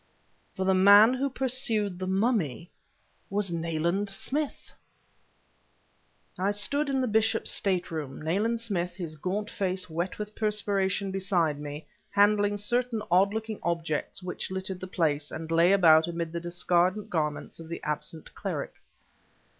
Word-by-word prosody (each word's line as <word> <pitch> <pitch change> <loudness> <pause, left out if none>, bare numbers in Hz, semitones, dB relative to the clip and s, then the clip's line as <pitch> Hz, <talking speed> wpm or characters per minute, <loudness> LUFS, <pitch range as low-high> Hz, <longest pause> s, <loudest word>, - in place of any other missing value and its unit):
For 190 - -2
the 190 - +3
man 200 +5 +7
who 270 +2 -1
pursued 240 -8 0
the 185 - -3
mummy 190 - 0 0.6
was 200 -2 -1
Nayland 170 +4 -1
Smith! 275 +9 -2 1.7
I 190 +2 +1
stood 280 +9 +1
in 265 -1 +1
the 255 - 0
bishop's 220 +1 +1
state 185 -4 0
room, 150 -5 -5
Nayland 205 +9 0
Smith, 180 -6 -2
his 170 -4 -5
gaunt 200 +7 -3
face 185 -3 -2
wet 175 +3 -3
with 210 0 -6
perspiration, 200 -2 0
beside 180 -6 0
me, 145 +1 -7 0.2
handling 205 0 +3
certain 235 +1 0
odd 190 +3 +4
looking 220 0 -4
objects 165 +1 -2
which 180 - -4
littered 190 0 -4
the 185 - -6
place, 155 -5 0
and 160 +1 -6
lay 170 +2 +5
about 165 -5 +6
amid 170 -1 -3
the 170 - -3
discarded 175 +4 0
garments 150 -2 -2
of 165 -1 -10
the 170 - -5
absent 150 +1 -4
cleric. - - -5
190 Hz, 145 wpm, -28 LUFS, 170-210 Hz, 1.7 s, man